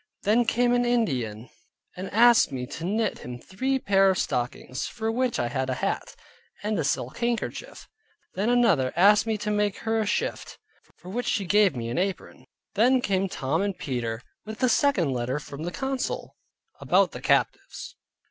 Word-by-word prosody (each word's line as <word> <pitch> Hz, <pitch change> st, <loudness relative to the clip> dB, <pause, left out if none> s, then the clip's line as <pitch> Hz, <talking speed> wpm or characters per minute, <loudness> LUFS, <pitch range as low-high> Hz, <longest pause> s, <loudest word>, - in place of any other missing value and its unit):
Then 225 Hz, +4 st, +3 dB
came 240 Hz, +2 st, +2 dB
an 245 Hz, 0 st, +3 dB
Indian, 130 Hz, -, -1 dB, 0.5 s
and 185 Hz, +1 st, -6 dB
asked 235 Hz, +2 st, +5 dB
me 125 Hz, -1 st, -4 dB
to 160 Hz, -, -8 dB
knit 215 Hz, +2 st, -1 dB
him 125 Hz, 0 st, -7 dB
three 260 Hz, -, -2 dB
pair 195 Hz, -5 st, +3 dB
of 190 Hz, -, +1 dB
stockings, 125 Hz, -1 st, -3 dB
for 225 Hz, 0 st, -3 dB
which 250 Hz, +1 st, 0 dB
I 120 Hz, -, 0 dB
had 130 Hz, +1 st, -2 dB
a 130 Hz, -, 0 dB
hat, -, -, -3 dB, 0.5 s
and 210 Hz, -2 st, -1 dB
a -, -, 0 dB
silk 135 Hz, -, -2 dB
handkerchief. 240 Hz, -, -3 dB, 0.5 s
Then 205 Hz, +5 st, -1 dB
another 200 Hz, -, +3 dB
asked 205 Hz, +5 st, +5 dB
me 220 Hz, -1 st, 0 dB
to 210 Hz, 0 st, -3 dB
make 210 Hz, -1 st, 0 dB
her 225 Hz, 0 st, +1 dB
a 215 Hz, -, -1 dB
shift, 210 Hz, -, -2 dB, 0.4 s
for 180 Hz, -, -12 dB
which 245 Hz, +6 st, -3 dB
she 205 Hz, -5 st, 0 dB
gave 200 Hz, -3 st, +3 dB
me 115 Hz, -1 st, -4 dB
an 120 Hz, -, -1 dB
apron. 190 Hz, 0 st, -4 dB, 0.3 s
Then 250 Hz, +5 st, +4 dB
came 195 Hz, -4 st, 0 dB
Tom 150 Hz, +2 st, -1 dB
and 200 Hz, -2 st, -2 dB
Peter, 120 Hz, -3 st, -3 dB, 0.2 s
with 220 Hz, 0 st, -8 dB
the 255 Hz, -, +2 dB
second 220 Hz, -, +2 dB
letter 125 Hz, +2 st, -2 dB
from 150 Hz, +1 st, -7 dB
the 175 Hz, -, -3 dB
council, 265 Hz, +4 st, -3 dB, 0.5 s
about -, -, +3 dB
the -, -, -8 dB
captives. -, -, -1 dB
200 Hz, 180 wpm, -26 LUFS, 140-230 Hz, 0.5 s, asked